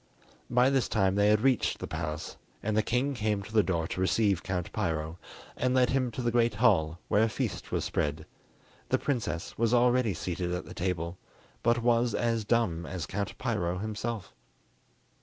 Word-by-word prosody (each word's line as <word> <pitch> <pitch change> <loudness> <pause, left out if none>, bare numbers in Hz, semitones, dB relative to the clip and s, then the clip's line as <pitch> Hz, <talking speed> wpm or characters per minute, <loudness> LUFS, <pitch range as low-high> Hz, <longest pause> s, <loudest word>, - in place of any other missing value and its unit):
By 125 +2 +4
this 135 -2 +1
time 95 -3 +2
they 100 +1 +3
had 105 0 +4
reached 130 -2 +2
the - - -5
palace, 75 +1 -4 0.3
and 110 0 0
the 110 - +4
king 125 +6 0
came 105 -4 -1
to 110 - -11
the 110 - +6
door 85 -4 -1
to 95 - -3
receive 100 -1 +2
Count 90 -2 -3
Piro, 80 -4 -2 0.4
and 125 +1 +1
led 125 -1 +4
him 130 -2 +1
to 125 - -4
the 120 - +1
great 115 -2 +2
hall, 90 -9 +3
where 105 - +3
a 115 - +3
feast - - -3
was - - 0
spread. 75 +1 -1 0.6
The - - +3
princess 115 - -3
was 115 +1 +3
already 120 -4 +3
seated 90 +1 -3
at 90 - -5
the - - -9
table, 90 -1 -3 0.4
but 120 0 +2
was 120 0 +3
as 115 -2 0
dumb 100 -8 +1
as 90 -4 -4
Count 100 +1 -4
Piro 90 -8 -1
himself. 110 0 -4
105 Hz, 185 wpm, -29 LUFS, 90-120 Hz, 0.6 s, the